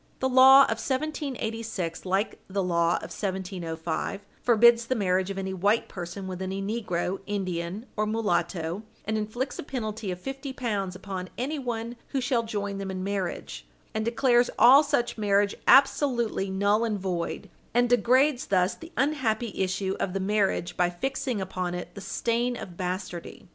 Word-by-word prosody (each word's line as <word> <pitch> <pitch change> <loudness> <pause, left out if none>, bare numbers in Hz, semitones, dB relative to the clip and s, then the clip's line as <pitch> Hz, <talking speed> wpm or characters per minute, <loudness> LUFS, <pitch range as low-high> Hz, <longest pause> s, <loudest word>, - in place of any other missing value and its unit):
The 260 - 0
law 265 +1 +8
of 225 -3 -1
1786, 230 - -3
like 190 +3 0
the 195 0 -1
law 170 -1 +2
of - - -5
1705, 185 -1 -3 0.2
forbids 235 0 +5
the 255 - +1
marriage 190 -3 +1
of 195 - -4
any 190 0 -3
white 200 +5 +1
person 180 +2 -6
with 185 0 -5
any 190 +1 -3
negro, 195 -3 -2
Indian, 185 0 -3
or 215 0 0
mulatto, 175 -4 -1 0.2
and 220 - -1
inflicts 220 +5 -3
a - - -1
penalty 220 -6 -4
of 180 -1 -4
fifty 270 +4 -6
pounds 205 -8 -2
upon 185 -1 -6
anyone 245 -4 -3
who 275 - -2
shall 250 -2 +1
join 205 -3 -3
them 195 -1 -4
in 185 -1 -4
marriage, 185 - -4 0.3
and 220 - -1
declares 240 +1 +3
all 270 +4 +8
such 240 -6 -1
marriage 200 -1 +2
absolutely 250 -7 +4
null 200 +3 +2
and 220 -3 0
void, 180 -3 -3 0.3
and 245 0 +4
degrades 250 +3 +3
thus 185 -1 +2
the 330 +1 -12
unhappy 245 -6 0
issue 190 0 -1
of 185 - -1
the 195 - -1
marriage 195 -3 0
by 175 -1 +2
fixing 255 +5 -2
upon 185 -2 -3
it 175 0 -6
the 200 - -9
stain 240 +4 -1
of 175 - -8
bastardy. 180 -1 -5
205 Hz, 160 wpm, -27 LUFS, 185-240 Hz, 0.3 s, law